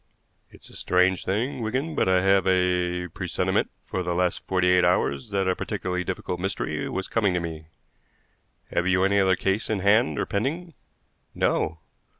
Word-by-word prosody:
"It's - - -17
a - - -15
strange 90 0 +2
thing, 120 +7 -1
Wigan, 130 +8 -2
but - - +1
I 90 -1 +3
have 95 -1 +4
had 95 - +4
a 90 -1 0
presentiment - - -1 0.2
for 95 - -3
the 90 -1 -2
last 90 0 +1
forty 90 -1 +1
eight 90 0 +4
hours 70 -6 +1
that 100 -2 0
a 95 - +2
particularly 90 0 -3
difficult 90 0 -4
mystery 95 +2 -3
was 95 - -3
coming 100 -5 +1
to - - +1
me. 80 -2 -6 1.0
Have 90 - 0
you 90 0 +3
any 100 +1 +3
other 95 -1 +4
case 95 +4 0
in 110 - +1
hand 105 +6 +3
or - - 0
pending?" 155 - -3 0.6
"No." 80 +1 0
95 Hz, 175 wpm, -25 LUFS, 90-100 Hz, 1.0 s, have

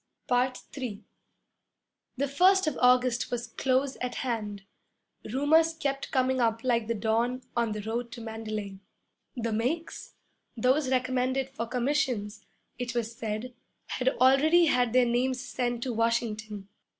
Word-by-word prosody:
III 250 -2 -1 1.1
The 280 +2 0
first 370 +7 +4
of 310 -4 -1
August 250 -1 +3
was 240 -1 -3
close 260 +3 0
at 250 0 -3
hand. 210 -6 -3 0.7
Rumors 320 +5 +3
kept 275 -4 -2
coming 260 0 +1
up 230 -1 +1
like 235 -3 +1
the 230 - 0
dawn 235 +4 0
'on 235 -2 +1
the 210 -1 -5
road 235 +2 -3
to 235 - -8
Mandalay.' 215 -3 -5 0.6
The 230 -2 -2
'makes' 265 +10 -3 0.4
(those 260 +4 +2
recommended 255 +1 0
for 230 -3 -4
commissions), 245 -5 -1 0.4
it 245 0 -3
was 230 -1 -2
said, 225 +3 -4 0.4
had 255 0 +1
already 295 +7 +5
had 250 -5 +2
their 255 -1 +5
names 250 +2 0
sent 245 -2 -2
to 255 - -2
Washington. 220 -3 -1
245 Hz, 135 wpm, -28 LUFS, 230-260 Hz, 1.1 s, already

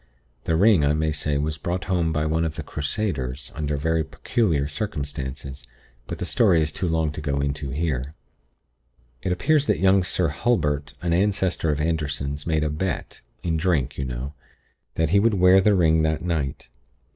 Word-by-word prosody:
The 80 - +1
ring, 95 -2 +5
I 70 +1 +3
may 80 0 0
say, 75 -1 -1
was 75 +2 -2
brought 90 +4 -2
home 85 -3 0
by 75 0 0
one 80 +1 +1
of 80 -2 -2
the - - -5
Crusaders, 75 -5 -3
under 75 -1 -2
very 80 +2 +1
peculiar 80 -4 0
circumstances; 70 -5 -5 0.4
but - - -5
the - - -4
story 95 -8 +3
is 80 0 0
too 90 - -2
long 80 -2 +1
to 75 - -6
go 70 -2 -1
into 70 0 -2
here. 70 -1 -2 1.1
"It 95 - -2
appears 145 - +2
that - - +2
young 95 0 +4
Sir 90 -2 0
Hulbert, 75 - 0
an 85 -1 +1
ancestor 95 -3 +1
of 75 -1 0
Anderson's, 75 -2 -2
made 80 -2 +1
a 75 - 0
bet, 90 +4 -3 0.2
in 80 -2 0
drink, 80 -5 0
you 70 - -1
know, 65 +3 -5 0.6
that 80 -1 +1
he 100 +4 +4
would 110 +1 +3
wear 90 +1 +6
the 105 +1 +4
ring 80 -3 +4
that 80 0 0
night. 75 -8 -2
80 Hz, 180 wpm, -24 LUFS, 75-90 Hz, 1.1 s, wear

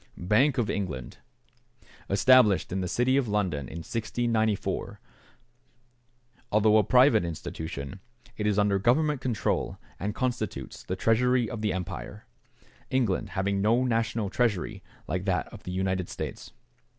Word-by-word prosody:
=Bank 125 +10 +2
of 120 -4 +1
England.= 75 -12 -4 0.9
Established 105 0 +5
in 95 +1 -1
the 90 - -2
city 125 +7 +2
of 135 -4 +1
London 95 - -1
in 85 0 -7
1694. 110 -2 -1 1.5
Although 110 +1 +5
a 110 - +5
private 125 -1 +5
institution, 80 -1 -6 0.4
it 105 -2 -1
is 105 -1 +1
under 100 -1 +3
Government 140 +6 +2
control, 120 -6 -1 0.2
and 105 +2 -3
constitutes 115 - -3
the 95 - -4
Treasury 120 +4 +2
of 110 +1 -5
the 105 - +1
Empire, 90 -1 -6 0.6
England 110 -5 0
having 100 +1 0
no 115 +5 +3
national 115 -4 0
treasury 110 -8 0 0.3
like 90 +4 -2
that 95 -3 0
of - - -12
the 90 - -4
United 95 -1 -1
States. - - -6
105 Hz, 135 wpm, -27 LUFS, 95-120 Hz, 1.5 s, Established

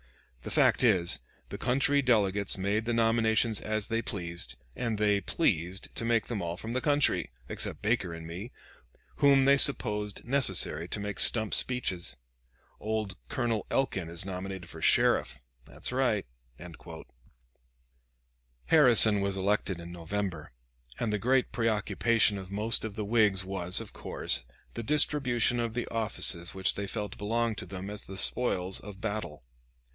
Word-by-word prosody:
The - - -7
fact - - +2
is, 90 -8 +3 0.3
the - - -7
country 140 +3 +2
delegates 100 -6 +2
made 100 +3 -1
the 120 - -1
nominations 115 -1 +2
as 110 -1 -2
they 115 0 -1
pleased, 85 -6 -5 0.2
and 115 -3 -2
they 105 -1 +2
pleased 90 +1 -1
to - - -4
make 115 -1 +1
them 115 -5 -4
all 85 0 -4
from 110 +4 -6
the 130 - -1
country, 145 0 +1 0.2
except - - -3
Baker 105 -5 0
and 85 -1 -8
me, 90 +9 -8 0.7
whom 140 -1 +4
they 140 0 +5
supposed 105 -7 +1
necessary 120 - +1
to 105 - -3
make 100 -1 -4
stump 110 -3 +4
speeches. 90 - -1 0.6
Old 110 -3 -3
Colonel 115 -4 -2
Elkin 95 -10 -1
is 85 +3 0
nominated 95 -1 -6
for 80 -1 -9
Sheriff - - +2 0.3
that's - - +1
right." 125 -6 0 2.4
Harrison 115 -9 +7
was 100 0 -1
elected 95 -2 -1
in 85 0 -9
November, 85 -3 -5 0.5
and 110 -3 -1
the 105 - -1
great 130 +4 +1
preoccupation 110 -1 +1
of 95 -1 -10
most 105 +3 +1
of 110 -2 -5
the 105 - -4
Whigs 105 -3 +2
was, 95 -1 0
of 115 -3 -8
course, - - +1 0.3
the 115 - -5
distribution 130 -3 +2
of 115 -1 -3
the 120 - -2
offices 100 -6 0
which 95 0 +1
they 100 0 -5
felt 105 0 -5
belonged 115 +1 -1
to 95 - -7
them 95 +2 -7
as 105 - -7
the 95 - -8
spoils 95 -4 +1
of 100 -1 -11
battle. 100 - -5
105 Hz, 150 wpm, -29 LUFS, 95-115 Hz, 2.4 s, Harrison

